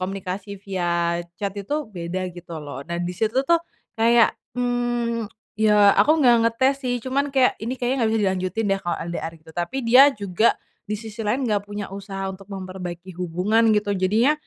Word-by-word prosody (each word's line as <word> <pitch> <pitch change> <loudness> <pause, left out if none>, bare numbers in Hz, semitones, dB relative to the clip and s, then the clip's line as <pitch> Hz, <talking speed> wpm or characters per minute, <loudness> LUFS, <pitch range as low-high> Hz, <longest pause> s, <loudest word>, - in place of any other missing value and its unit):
komunikasi 195 +1 -4
via 170 -3 0 0.2
chat 200 -1 -2
itu 200 +9 -3 0.2
beda 180 +1 -4
gitu 170 -1 -9
loh 140 -2 -7
dan 170 0 -2
di 175 - -2
situ 220 +5 -1
tuh 335 +4 +4 0.4
kayak, 230 0 +5 0.2
mmm, 240 -2 -1 0.3
ya 210 -2 +6
aku 310 +2 +5
nggak 240 -1 +7
ngetes 260 +4 +2
sih 250 -2 -1
cuman 275 +2 0
kayak 265 -2 +3
ini 235 +4 -3
kayaknya 250 +1 0
nggak 225 -2 +2
bisa 215 - +1
dilanjutin 190 +3 -1
deh 195 - -1
kalau 175 - -2
LDR 170 -1 -4
gitu. 160 0 -17
Tapi 175 +8 -3
dia 255 +5 +8
juga, 200 +2 +2 0.3
di 210 - -1
sisi 220 +1 -9
lain 225 +5 0
nggak 205 -3 -1
punya 205 -1 -6
usaha 195 -1 -5
untuk 195 +1 -13
memperbaiki 185 -2 -7
hubungan 190 +6 +2
gitu 205 -1 0
jadinya, 210 +8 +3
205 Hz, 180 wpm, -23 LUFS, 185-235 Hz, 0.4 s, dia